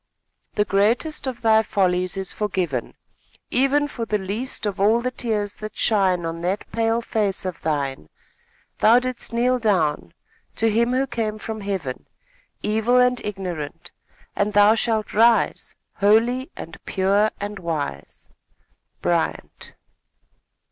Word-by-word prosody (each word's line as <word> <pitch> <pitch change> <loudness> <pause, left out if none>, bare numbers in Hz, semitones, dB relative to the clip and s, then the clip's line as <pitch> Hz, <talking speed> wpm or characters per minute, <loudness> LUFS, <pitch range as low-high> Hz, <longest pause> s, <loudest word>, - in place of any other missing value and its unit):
The 210 - +2
greatest 230 +10 +1
of 245 -2 -5
thy 220 -1 +5
follies 185 -3 0
is 190 -1 -4
forgiven, 180 - -2 0.6
Even 275 +3 +3
for 240 -5 -5
the 215 -2 0
least 210 +6 -3
of 205 -1 -2
all 215 +4 +4
the 255 +1 -2
tears 210 -5 -2
that 215 0 -8
shine 190 -6 +2
On 165 0 -4
that 185 +4 -1
pale 230 0 +1
face 210 -5 -1
of 185 -2 -5
thine. 140 - -2 0.7
Thou 225 +3 +6
didst 255 -1 -3
kneel 250 +2 +2
down, 160 - 0 0.4
to 225 0 +2
him 235 +3 +2
who 265 +1 +2
came 220 -4 -3
from 220 0 -6
heaven, 190 -10 -4 0.6
Evil 220 +4 +2
and 250 0 +3
ignorant, 180 -8 -5 0.4
and 205 +1 0
thou 205 +1 +6
shalt 225 -1 -1
rise, 230 +2 +3 0.2
Holy, 230 +6 +3
and 165 - -9
pure, 200 +3 +2
and 205 0 -5
wise. 165 -5 -5 0.8
Bryant. - - -2
210 Hz, 135 wpm, -23 LUFS, 190-235 Hz, 0.8 s, Thou